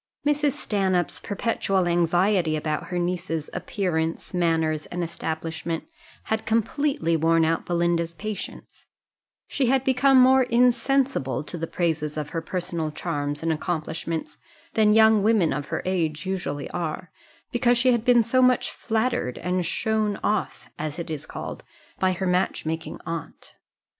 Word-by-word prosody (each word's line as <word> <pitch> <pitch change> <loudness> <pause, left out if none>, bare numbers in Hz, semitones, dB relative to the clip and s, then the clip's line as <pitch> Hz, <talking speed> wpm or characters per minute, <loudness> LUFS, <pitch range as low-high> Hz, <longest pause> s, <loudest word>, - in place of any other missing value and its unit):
Mrs. 295 -1 +2
Stanhope's 190 -5 0
perpetual 195 -3 0
anxiety 175 0 +2
about 155 +2 -2
her 180 +2 -3
niece's 175 -3 -2
appearance, 165 -5 -2
manners, 160 -3 +1
and 175 0 -3
establishment, 165 0 -4 0.4
had 220 0 -1
completely 230 - +1
worn 165 +1 +3
out 165 +1 0
Belinda's 170 -1 0
patience; 215 +3 -7 0.6
she 270 -3 0
had 265 +1 +3
become 265 0 +4
more 260 +1 +6
insensible 250 - +2
to 155 - -7
the 165 -1 -3
praises 160 -4 -1
of 150 -1 -3
her 165 - -3
personal 170 -2 -3
charms 145 0 -3
and 165 0 +2
accomplishments 160 0 -3 0.3
than 215 -1 +4
young 220 -1 +6
women 210 -5 +3
of 145 0 -4
her - - -3
age 165 -4 -1
usually 180 -7 -3
are, 170 -1 -4 0.4
because 240 0 +3
she 255 +1 +4
had 235 -2 +1
been 240 -1 +5
so 255 +3 +2
much 255 -1 +3
flattered 220 - -1
and 180 0 -1
shown 215 +1 0
off, 210 -2 -1
as 155 0 -3
it 170 -2 -5
is 150 -3 -5
called, - - -6 0.4
by 185 0 +3
her 190 +2 -3
match 180 -1 0
making 160 +1 -4
aunt. 165 -1 -6
175 Hz, 145 wpm, -25 LUFS, 160-220 Hz, 0.6 s, more